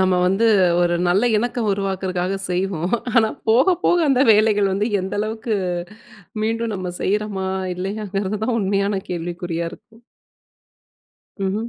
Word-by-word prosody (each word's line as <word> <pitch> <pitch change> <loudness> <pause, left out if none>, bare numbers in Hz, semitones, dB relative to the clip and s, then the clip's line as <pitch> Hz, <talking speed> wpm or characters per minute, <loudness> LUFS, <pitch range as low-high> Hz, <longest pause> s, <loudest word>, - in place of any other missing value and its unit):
நம்ம 185 -1 +3
வந்து 195 +5 +2 0.4
ஒரு 175 0 +2
நல்ல 185 +4 +3
இணக்கம் 235 0 -1
உருவாக்குறதுக்காக 190 -1 -2
செய்வோம். 180 0 -1 0.2
ஆனா 220 -2 +5 0.2
போக 260 +11 +5
போக 350 - +4
அந்த 265 -2 +3
வேலைகள் 210 -2 +3
வந்து 205 +4 0
எந்த 190 +1 -4
அளவுக்கு, 220 +1 -2 0.9
மீண்டும் 225 +1 -1
நம்ம 185 -1 -4
செய்றோமா 200 -1 -1 0.3
இல்லையாங்கிறது 200 +1 -3
தான் 230 0 0
உண்மையான 200 0 0
கேள்விக்குறியா 170 -1 -3
இருக்கும். 225 +4 -16 1.4
ம்ஹம். 210 +4 -1
200 Hz, 125 wpm, -21 LUFS, 185-220 Hz, 1.4 s, ஆனா